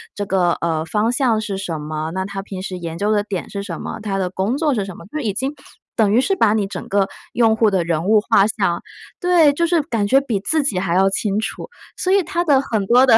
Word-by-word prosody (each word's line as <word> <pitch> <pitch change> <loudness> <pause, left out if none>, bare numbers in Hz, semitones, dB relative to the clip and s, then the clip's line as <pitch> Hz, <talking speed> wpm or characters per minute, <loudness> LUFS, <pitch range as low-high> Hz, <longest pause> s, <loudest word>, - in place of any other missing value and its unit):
这 205 - -3
个， 180 -3 +2
呃， 160 -2 0
方 210 +7 0
向 245 -4 +2
是 210 -3 -3
什 175 -4 -3
么？ 155 +1 -4
那 190 +1 -2
他 195 0 -5
平 195 -1 -7
时 190 - -5
研 170 -2 -6
究 205 +4 0
的 210 - +3
点 200 -3 -5
是 200 - -4
什 180 -5 -6
么？ - - -6
他 200 -2 -2
的 185 -2 -1
工 195 +7 -1
作 300 -2 +1
是 215 -5 0
什 195 -2 -8
么？” 170 - -12
就 305 - -2
已 225 -8 -1
经 265 +7 -2 0.4
等 210 -3 +3
于 240 - +5
是 390 - +1
把 225 - +3
你 215 -2 +1
整 195 - -7
个 200 -1 +1 0.2
用 225 -2 +3
户 220 -1 +4
的 190 -3 +1
人 165 0 -1
物 215 +1 +4
画 210 -2 +4
像 200 -5 -1 0.4
对， 350 -5 +5
就 335 +4 +1
是 335 -1 +2
感 225 -7 -1
觉 270 +6 +4
比 235 -7 -2
自 295 +10 0
己 210 -10 0
还 180 -2 -1
要 190 +1 +4
清 200 +1 -1
楚。 - - -5 0.3
所 370 - +1
以 395 -1 +4
它 345 0 -1
的 280 -4 +4
很 220 -7 -2
多 245 +5 +5
的 235 -4 +7
205 Hz, 280 characters per minute, -20 LUFS, 190-250 Hz, 0.4 s, 的